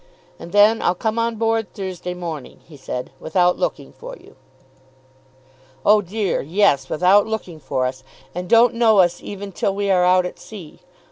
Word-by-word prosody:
"And 170 - -10
then 210 +3 +4
I'll 175 - +1
come 220 +4 -2
on 230 0 -1
board 225 -1 0
on - - -35
Thursday 185 -2 -6
morning," 165 -6 -7
he 155 - -14
said, 125 -2 -6
"without 180 +2 +1
looking - - -3
for - - -10
you." - - -19 1.5
"Oh 210 0 +5
dear, 200 +1 -2
yes; 150 -4 +1
without 190 +6 +3
looking 200 -7 -5
for 130 -2 -2
us. 130 +1 -5 0.3
And 180 +1 -6
don't 235 +1 +5
know 230 -2 +3
us 175 -2 +3
even 200 0 -8
till 195 +2 -2
we 200 -1 -1
are 180 -1 +3
out 180 0 +3
at 180 - -7
sea. 190 -8 -12
190 Hz, 180 wpm, -20 LUFS, 175-215 Hz, 1.5 s, Oh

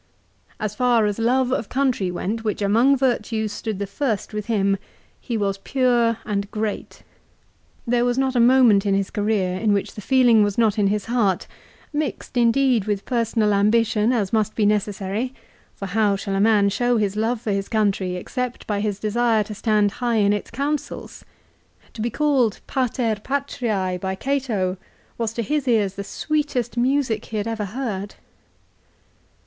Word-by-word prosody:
As 215 -1 -2
far 240 -1 +3
as 205 +1 -1
love 250 +2 +2
of 230 - -2
country 255 -8 0
went, 205 +6 -3
which 210 -1 -2
among 235 +8 +4
virtues 225 -4 0
stood 215 0 -4
the 200 - -2
first 215 0 -2
with 210 0 -4
him, 200 -3 +1 0.4
he 235 -3 -3
was 195 -2 -1
pure 240 -1 +2
and 200 -1 -2
great. 215 -1 -4 0.8
There 240 0 +2
was 245 0 +1
not 265 -1 +1
a - - +3
moment 235 -4 +5
in 200 -1 +1
his 195 -1 -1
career 205 -3 0
in 215 -1 +2
which 200 - -1
the 210 - -8
feeling 245 -1 +4
was 205 -1 -1
not 220 -2 +2
in 200 - +3
his 205 0 -1
heart, 215 -6 +1 0.5
mixed 295 -3 -3
indeed 240 -2 +3
with 205 -2 -2
personal 225 -3 +1
ambition 215 +2 +2
as 215 -6 -1
must 215 -1 +1
be 215 - +2
necessary, 210 +4 -1 0.4
for 195 - -6
how 200 +1 +1
shall 195 0 -4
a 195 - 0
man 210 -2 +4
show 245 +4 +1
his 205 -2 0
love 225 +2 0
for 220 -2 -3
his 195 0 -2
country 200 -4 0
except 250 +6 -4
by 205 -2 -1
his 205 -1 -1
desire 220 +1 +1
to 210 - -8
stand 210 -1 +1
high 240 -1 +1
in 205 -2 +3
its 205 - -3
counsels? 280 +4 -4 0.7
To 220 - -6
be 235 - 0
called 260 -5 +1
" - - -37
Pater 245 -4 0
Patriae 230 -9 -2
" - - -29
by 190 0 -2
Cato 220 -7 -1 0.4
was 230 -2 -1
to 235 - -2
his 290 +3 -1
ears 210 -5 +2
the 200 - -5
sweetest 290 0 -2
music 250 -3 +1
he 220 - -5
had 205 - -1
ever 220 -2 -2
heard. 205 -3 -4
220 Hz, 175 wpm, -22 LUFS, 205-245 Hz, 0.8 s, moment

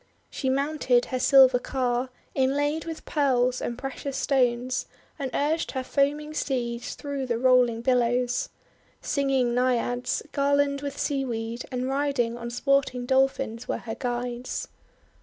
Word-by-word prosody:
She 265 - -2
mounted 275 -2 +2
her 255 - -3
silver 260 -2 +6
car, 250 -1 -1 0.2
inlaid 290 +4 +1
with 325 -1 -7
Pearls 255 -4 +1
and 235 - -3
precious 270 +1 -5
stones, 255 -2 +1 0.3
and 270 -2 -2
urged 305 +5 0
her 260 -1 -2
foaming 295 +3 0
steeds 245 -5 -2
through 280 -2 -4
the 235 -2 0
rolling 250 -2 +4
billows. 245 0 +1 0.5
Singing 270 -4 +1
Naiads, 245 0 0
garlanded 280 0 +1
with 285 -1 -5
seaweed, 240 -4 -2
and 255 0 -2
riding 270 -4 0
on 235 0 -6
sporting 255 0 +1
Dolphins, 265 -3 +1
were - - -1
her 225 - -6
guides. 245 0 -3
260 Hz, 130 wpm, -26 LUFS, 245-280 Hz, 0.5 s, silver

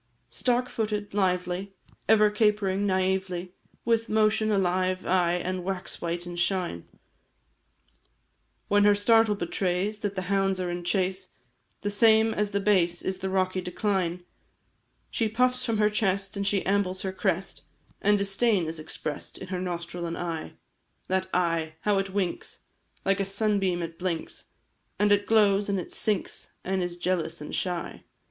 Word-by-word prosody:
Stark 250 0 +1
footed, 210 -3 -3
lively, 185 0 -1 0.3
Ever 215 -1 +6
capering 210 -2 +1
naively 185 -1 -1 0.3
With 230 -1 +1
motion 215 0 +2
alive, 185 -1 +1
aye, 175 -2 +2
And 180 0 -3
wax 190 0 -4
white, 170 +1 -3
in 175 0 -7
shine, 175 - -1 1.8
When 205 0 +4
her 205 0 +6
startle 225 +1 +4
betrays 190 +3 -1
That 205 -2 -3
the 185 - -2
hounds 195 0 +1
are 180 -1 -2
in 175 0 -4
chase, 185 +1 0 0.5
The 205 - -1
same 220 +1 +5
as 210 -1 0
the 200 0 -1
base 180 -4 +2
Is 190 0 -2
the 190 0 -2
rocky 185 0 0
decline 180 -1 -1 0.9
She 225 -2 0
puffs 250 +3 +1
from 230 -3 0
her 210 0 +4
chest, 200 -2 0
And 200 0 -1
she 200 -1 +1
ambles 190 -1 0
her 190 -1 -2
crest 190 -1 -1 0.4
And 205 +1 +4
disdain 200 -1 +2
is 160 0 -4
express'd 155 -1 -5
In 190 - -9
her 185 -1 -2
nostril 170 -1 -4
and 165 - -4
eye; 165 -2 -4 0.6
That 190 0 +1
eye 165 -3 0
how 205 -2 +2
it 195 0 -2
winks! 190 -2 -3 0.4
Like 195 0 +2
a - - +2
sunbeam 195 -3 +1
it 165 0 -7
blinks, 175 -3 -3 0.5
And 205 0 +3
it 205 0 +3
glows, 205 -2 +4
and 195 -1 +1
it 180 - -7
sinks, 210 -3 -1
And 190 0 -1
is 175 -1 -3
jealous 175 -2 -1
and 150 - -8
shy! 180 -2 -3
190 Hz, 155 wpm, -27 LUFS, 180-205 Hz, 1.8 s, Ever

